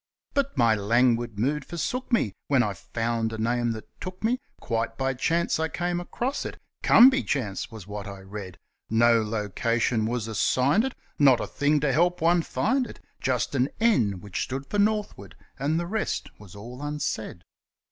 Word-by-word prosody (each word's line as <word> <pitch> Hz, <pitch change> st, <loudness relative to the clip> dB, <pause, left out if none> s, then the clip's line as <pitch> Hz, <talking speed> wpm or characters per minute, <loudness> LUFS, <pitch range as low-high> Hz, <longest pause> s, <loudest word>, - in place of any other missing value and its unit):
But 280 Hz, -, 0 dB
my 115 Hz, -3 st, +5 dB
languid 115 Hz, +1 st, +2 dB
mood 140 Hz, +7 st, 0 dB
forsook 250 Hz, -, -4 dB
me, 115 Hz, -, +2 dB
when 135 Hz, -3 st, +4 dB
I 105 Hz, -, -1 dB
found 115 Hz, +3 st, -2 dB
a 110 Hz, -, -5 dB
name 120 Hz, +1 st, 0 dB
that 110 Hz, -, -9 dB
took 185 Hz, +1 st, -7 dB
me, 240 Hz, +3 st, +1 dB, 0.2 s
Quite 115 Hz, -1 st, -2 dB
by 135 Hz, 0 st, 0 dB
chance 165 Hz, +6 st, 0 dB
I 160 Hz, -, +1 dB
came 175 Hz, +1 st, -2 dB
across 245 Hz, +10 st, -3 dB
it -, -, -6 dB, 0.2 s
'Come 255 Hz, +3 st, +8 dB
by 265 Hz, +1 st, +1 dB
Chance' 110 Hz, -9 st, -2 dB
was 110 Hz, -5 st, -10 dB
what 105 Hz, -1 st, -6 dB
I 100 Hz, -1 st, -8 dB
read; 95 Hz, -1 st, -8 dB, 0.3 s
No 115 Hz, +1 st, +4 dB
location 110 Hz, +2 st, 0 dB
was 115 Hz, -2 st, -2 dB
assigned 130 Hz, -, +2 dB
it, 265 Hz, -, -4 dB, 0.2 s
not 135 Hz, -4 st, +6 dB
a -, -, -2 dB
thing 145 Hz, +1 st, +1 dB
to 145 Hz, -3 st, +1 dB
help 175 Hz, +4 st, +2 dB
one 170 Hz, +1 st, +4 dB
find 235 Hz, -, 0 dB
it, -, -, -11 dB, 0.2 s
Just 125 Hz, -1 st, 0 dB
an 130 Hz, 0 st, +2 dB
N 115 Hz, -, +2 dB
which 100 Hz, -3 st, -4 dB
stood 135 Hz, +1 st, -3 dB
for 205 Hz, -, -2 dB
northward, 210 Hz, 0 st, 0 dB, 0.2 s
and 150 Hz, +5 st, +1 dB
the 170 Hz, -, -2 dB
rest 215 Hz, +5 st, -2 dB
was 105 Hz, -2 st, -13 dB
all 120 Hz, +6 st, -9 dB
unsaid. 145 Hz, -11 st, -3 dB
125 Hz, 180 wpm, -26 LUFS, 110-170 Hz, 0.3 s, Come